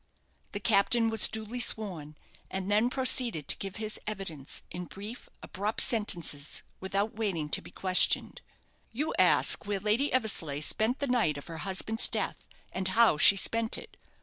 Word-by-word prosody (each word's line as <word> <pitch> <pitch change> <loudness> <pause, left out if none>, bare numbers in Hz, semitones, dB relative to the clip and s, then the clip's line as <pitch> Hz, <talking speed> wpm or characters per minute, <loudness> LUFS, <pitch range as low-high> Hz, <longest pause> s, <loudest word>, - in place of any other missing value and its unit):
The 205 - -4
captain 225 +2 +1
was 225 - +6
duly 220 +2 -7
sworn, 180 -10 +1 0.3
and 190 +1 -5
then 215 +4 +2
proceeded 250 - 0
to - - +4
give 195 -1 -7
his 215 0 -5
evidence, 185 -10 -6
in 180 +1 -7
brief, 205 +7 -10
abrupt 205 +3 -4
sentences, 170 -10 +2 0.2
without 195 +3 -3
waiting 190 -9 -3
to - - -1
be - - -14
questioned. 185 -1 +1 0.5
"You 295 +7 -4
ask - - +3
where 205 -1 -2
Lady 215 +8 0
Eversleigh 165 - 0
spent 220 - -1
the 280 - -3
night 235 - 0
of 145 - -10
her 165 -1 -9
husband's 200 +5 0
death, - - -5 0.2
and 190 0 -2
how 220 -3 +3
she 195 - +8
spent 225 +3 +1
it. - - -13
205 Hz, 160 wpm, -28 LUFS, 185-225 Hz, 0.5 s, she